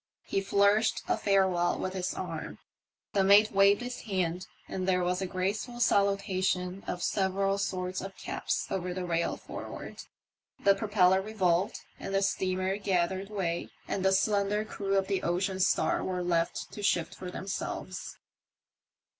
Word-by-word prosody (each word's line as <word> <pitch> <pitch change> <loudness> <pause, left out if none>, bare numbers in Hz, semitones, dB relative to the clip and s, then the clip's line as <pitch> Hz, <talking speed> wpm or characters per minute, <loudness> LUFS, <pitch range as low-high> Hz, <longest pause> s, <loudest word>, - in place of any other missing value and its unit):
He 195 - -1
flourished 200 +3 +3
a - - +2
farewell 190 -3 +2
with 185 - -3
his 185 0 -2
arm; - - -5 0.6
the 195 - +3
mate 205 +2 +6
waved 200 +2 +5
his 245 0 -5
hand, 185 -4 -2 0.2
and 185 -1 -3
there 180 -1 +2
was 180 +1 0
a 190 - -1
graceful 200 +6 -2
salutation 195 -3 +1
of 180 - -3
several 195 0 +1
sorts 185 -2 -2
of 195 0 -8
caps - - -2
over 180 -1 -2
the 185 -1 -3
rail 170 -1 0
forward. - - -8 0.6
The 200 - +6
propeller 195 -2 +3
revolved, 190 -3 0 0.2
the 195 0 -1
steamer 185 0 0
gathered 190 -1 0
way, 175 -5 -2 0.2
and 190 - -2
the 190 - +4
slender 205 +2 +2
crew 195 -2 -1
of 195 - +2
the 195 -1 -1
Ocean 185 +2 -1
Star 185 - +2
were 180 -1 -2
left 170 -1 -1
to 210 - -7
shift 175 -4 +1
for 180 - -7
themselves. 190 +2 -5
190 Hz, 150 wpm, -30 LUFS, 180-200 Hz, 0.6 s, mate